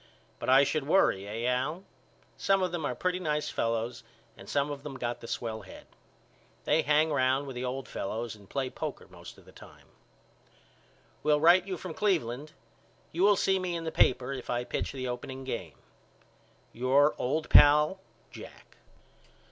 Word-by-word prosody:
But - - -3
I 135 +2 +7
should 140 0 -1
worry 100 - +3
eh 115 +3 -4
Al? 140 +8 -1 0.5
Some 195 -1 +2
of 180 - -1
them 170 -4 -3
are 125 - -2
pretty 180 +4 -1
nice 150 -4 -1
fellows 115 +1 -2 0.3
and - - -13
some 145 0 0
of 140 -1 -6
them 140 -1 -7
got 120 -1 -3
the 115 - -9
swell 115 -2 -4
head. 95 - -13 0.8
They 160 - +2
hang 150 +1 +2
round 130 0 +2
with 135 -2 -7
the 125 +1 -3
old 130 +1 -4
fellows 110 +3 -4
and 100 -2 -18
play 135 -2 -2
poker - - -6
most - - -13
of - - -18
the - - -16
time. - - -16 1.3
Will 150 -1 +3
write 175 +4 +5
you 185 -2 -3
from 175 0 -7
Cleveland. 155 - -1 0.6
You 170 - -3
will 205 +1 +6
see 190 0 +2
in 175 -3 -3
the 160 - -3
paper 125 -1 +2
if 130 -2 -8
I 120 0 -1
pitch - - -3
the 130 -2 -5
opening 130 +2 -6
game. 115 - -5 1.0
Your 135 +5 +3
old 155 +5 -1
pal, 150 +5 +6 0.3
JACK. - - -13
140 Hz, 170 wpm, -29 LUFS, 125-160 Hz, 1.3 s, I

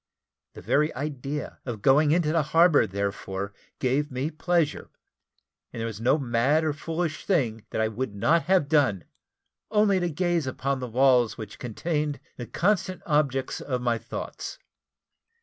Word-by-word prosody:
The - - -10
very 150 +2 +2
idea 140 +1 -4
of 115 -5 -6
going 145 +3 +5
into 160 -1 +2
the 165 0 +3
harbour, 165 +1 +4
therefore, 100 0 -3 0.2
gave 140 +4 0
me 130 +5 -2
pleasure, 165 -1 0 0.8
and - - -7
there 115 - -2
was 110 -2 -5
no 130 +5 +3
mad 135 +3 +2
or 155 -2 0
foolish 160 +1 -3
thing 120 - 0
that - - -1
I 110 - +2
would 110 0 -4
not 160 +12 +2
have 185 -5 +3
done, 135 - +2 0.7
only 210 -2 +3
to 175 -1 0
gaze 170 -2 0
upon 135 +1 -2
the 125 - -4
walls 125 -1 +3
which 110 -3 -8
contained 150 +4 -2 0.2
the 120 - -7
constant 185 -1 0
objects 140 -4 0
of 130 -3 -2
my 120 -2 +1
thoughts. - - -6
140 Hz, 155 wpm, -26 LUFS, 120-160 Hz, 0.8 s, going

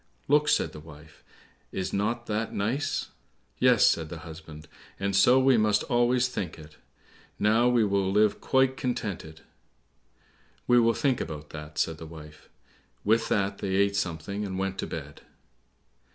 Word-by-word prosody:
"Look," 150 +1 +3
said - - +2
the 75 - -10
wife, 75 -1 -15 0.5
"is 95 - -4
not 115 +4 -1
that 110 0 -3
nice!" 115 +8 -1 0.5
"Yes," 125 -4 +5
said 80 -2 +2
the 85 - -7
husband, 80 -1 -11 0.3
"and 100 0 -1
so 120 +7 +6
we 130 -1 +4
must 105 -1 +2
always 125 0 +2
think 95 -10 -5
it,—now 105 +8 -2
we 120 -2 +3
will 100 -1 0
live 105 +1 +2
quite 130 0 +2
contented." 95 -10 -4 1.2
"We 125 0 +5
will 115 -1 +3
think 135 -5 +1
about 75 -2 -7
that," 75 -1 -9
said 80 0 -1
the 80 - -8
wife. 75 -2 -13 0.5
With 110 +2 +2
that 100 -1 0
they 95 -1 -2
ate 100 +1 +2
something 100 +2 -3
and 95 -2 -4
went 95 0 -3
to - - -2
bed. 75 -2 -8
100 Hz, 150 wpm, -27 LUFS, 80-120 Hz, 1.2 s, so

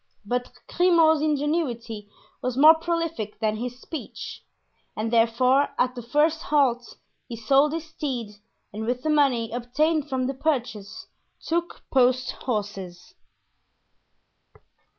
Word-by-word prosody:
But 245 +3 -2 0.2
Grimaud's 330 -4 +4
ingenuity 275 -8 -1 0.3
was 255 0 -2
more 305 +3 +9
prolific 330 -10 -3
than 215 -1 0
his 245 +2 -5
speech, 315 +2 -8 0.5
and 225 +2 -2
therefore 250 +4 +3
at 250 0 +1
the 245 - -7
first 300 +7 +1
halt 260 -7 +1 0.3
he 235 - -6
sold 270 +6 +3
his 325 0 -4
steed 245 -9 -5 0.4
and 220 +2 -5
with 250 +1 -2
the 310 - +1
money 265 -7 +2
obtained 295 +6 0
from 260 -1 -1
the 270 - -1
purchase 245 -8 -3 0.4
took 340 +1 -2
post 255 -1 +3
horses. 195 -6 -5
255 Hz, 120 wpm, -25 LUFS, 230-305 Hz, 0.5 s, more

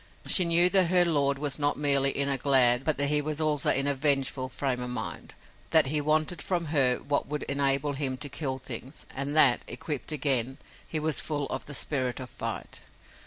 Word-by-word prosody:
She 185 - +4
knew 170 +1 +5
that 190 -3 +6
her 180 -1 +3
lord 140 -4 0
was 145 0 0
not 145 0 0
merely 140 -2 +2
in 140 0 -1
a 140 - +1
glad, 130 -2 +2
but 155 0 +1
that 140 - +2
he 150 0 +2
was 155 +1 -4
also 150 -2 +1
in 135 - +2
a 140 - +2
vengeful 135 -2 +1
frame 130 -2 -4
of 125 - -3
mind, 125 - -6 0.3
that 160 -3 +6
he 150 - 0
wanted 155 +2 0
from 175 -3 -3
her 130 -4 +3
what 145 0 -3
would 150 +1 -5
enable 140 +1 0
him 135 -2 -2
to 130 - -3
kill 140 -1 -4
things, 130 +2 -7
and 140 +2 -3
that, 140 -6 +5
equipped 150 -1 -5
again, 135 -3 0 0.3
he 155 - -3
was 155 -1 +1
full 145 -2 -3
of 130 - -5
the 145 - -5
spirit 130 -3 -1
of 130 -1 -10
fight. - - -7
140 Hz, 210 wpm, -26 LUFS, 135-150 Hz, 0.3 s, that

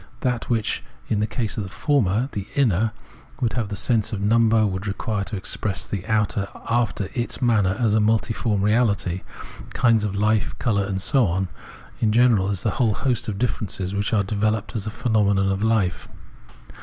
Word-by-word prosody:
That 125 -2 -1
which 115 -3 0 0.3
in 105 - +1
the 105 - +1
case 110 -1 -3
of 105 - -1
the 95 - -7
former, 120 -1 +1
the 100 0 -5
inner, 110 -5 +2 0.5
would 120 -3 0
have 115 -4 -2
the 105 - -3
sense 110 +1 +1
of 105 - -3
number, 110 +1 +3
would 95 0 -3
require 100 +1 -2
to 110 - -5
express 100 0 -3
the 100 -4 -4
outer 105 -2 +1 0.2
after 110 -4 0
its 120 -1 -2
manner 105 -6 +2
as 115 -4 +2
multiform 110 -1 +1
reahty, 100 -5 +1 0.3
— - - -13
kinds 115 -4 +3
of 105 -2 -1
hfe, 100 -8 +1
colour 100 -4 +1
and 95 -1 -2
so 130 +3 +3
on, 90 +2 -1 0.5
in 110 - +2
general 115 -4 +4
as 100 -3 -1
the 110 - +1
whole 110 -4 +2
host 125 -4 -1
of 105 -3 -3
differences 100 -5 -2
which 100 +1 -1
are 105 -3 +2
developed 110 +3 -1
as 105 -1 -3
phenomena 105 -3 +1
of 95 0 0
hfe. 110 -4 0
105 Hz, 180 wpm, -23 LUFS, 100-115 Hz, 0.5 s, general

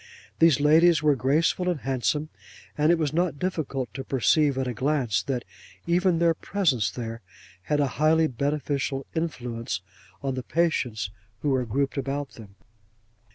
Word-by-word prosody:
These 165 -4 +5
ladies 160 +2 +5
were 150 -1 +5
graceful 155 +7 +1
and 170 -6 -2
handsome; 135 +3 -1 0.5
and 150 +2 +3
it 170 - +4
was 155 -3 -1
not 170 -2 0
difficult 140 - -3
to 135 - -5
perceive 140 +2 +2
at 130 -1 -1
a 125 - -2
glance 130 -6 0
that 125 +5 -3 0.4
even 175 0 +2
their 170 0 +3
presence 155 - 0
there, 115 +2 -6 0.4
had 150 - +1
a 145 - +3 0.2
highly 160 +1 +4
beneficial 140 0 -2
influence 120 - -3 0.4
on 135 -1 -1
the 130 - -3
patients 125 - -1 0.3
who 145 - +1
were 130 -2 0
grouped 140 +4 -1
about 140 +1 -3
them. 100 -4 -13
140 Hz, 155 wpm, -26 LUFS, 125-160 Hz, 0.5 s, These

